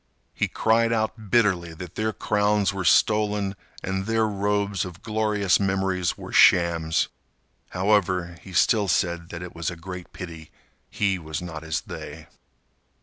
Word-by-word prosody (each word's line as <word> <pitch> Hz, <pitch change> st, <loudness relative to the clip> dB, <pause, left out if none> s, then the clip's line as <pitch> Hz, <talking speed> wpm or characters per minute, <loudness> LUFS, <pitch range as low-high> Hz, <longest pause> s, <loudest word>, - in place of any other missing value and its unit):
He -, -, 0 dB
cried 115 Hz, +1 st, +2 dB
out 110 Hz, -1 st, -2 dB
bitterly 95 Hz, -7 st, +2 dB
that 90 Hz, 0 st, -9 dB
their 110 Hz, 0 st, -1 dB
crowns 105 Hz, -1 st, +1 dB
were 95 Hz, -1 st, -3 dB
stolen 105 Hz, +3 st, +2 dB, 0.3 s
and 95 Hz, +1 st, -2 dB
their 115 Hz, -1 st, +2 dB
robes 100 Hz, -1 st, 0 dB
of 90 Hz, -1 st, -9 dB
glorious 105 Hz, -3 st, +1 dB
memories 95 Hz, -2 st, 0 dB
were -, -, -9 dB
shams. 85 Hz, -2 st, +4 dB, 0.6 s
However, 90 Hz, -3 st, +1 dB
he 95 Hz, -, -12 dB
still 100 Hz, +3 st, +3 dB
said 85 Hz, -1 st, 0 dB
that 85 Hz, 0 st, -6 dB
it 90 Hz, -, -8 dB
was 85 Hz, -2 st, -3 dB
a 85 Hz, -, -6 dB
great 90 Hz, +1 st, -8 dB
pity 80 Hz, -3 st, -9 dB, 0.4 s
he 100 Hz, -3 st, 0 dB
was 80 Hz, -2 st, -5 dB
not 80 Hz, -3 st, -7 dB
as 80 Hz, -1 st, -2 dB
they. -, -, -9 dB
95 Hz, 145 wpm, -25 LUFS, 85-105 Hz, 0.6 s, shams